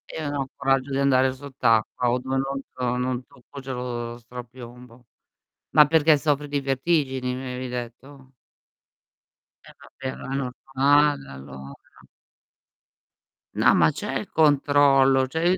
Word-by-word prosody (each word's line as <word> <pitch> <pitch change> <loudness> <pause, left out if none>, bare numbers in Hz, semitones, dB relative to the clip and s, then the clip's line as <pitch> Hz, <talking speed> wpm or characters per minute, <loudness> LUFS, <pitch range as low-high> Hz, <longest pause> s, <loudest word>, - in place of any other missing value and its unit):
Io 160 - -4
non - - -4
ho 135 - -5
coraggio 135 0 0
di 135 - -1
andare 130 -1 +3
sott'acqua, 125 -3 0
o 120 - +1
dove 130 +1 -3
non 135 +1 -2
to 125 -1 -2
non 125 0 -2
tocco, 125 +3 -14
c'è 135 -1 -6
lo 120 -1 -5
strapiombo. 120 0 -12 0.6
Ma 150 -1 +6
perché 160 0 +4
soffri 145 0 -1
di 145 - -1
vertigini, 135 -2 -1
mi 130 - -6
avevi 125 0 -5
detto? 130 +3 -8 1.3
Eh - - -15
vabbè, 130 -1 -8
ma 135 - -7
è - - -1
normale 140 +2 +1
allora. 70 0 -10 1.8
No, - - +4
ma - - +4
c'è - - -4
il - - -8
controllo. 140 -3 +4
Cioè, 160 +5 -1
io 185 - +2
130 Hz, 145 wpm, -24 LUFS, 125-140 Hz, 1.8 s, Ma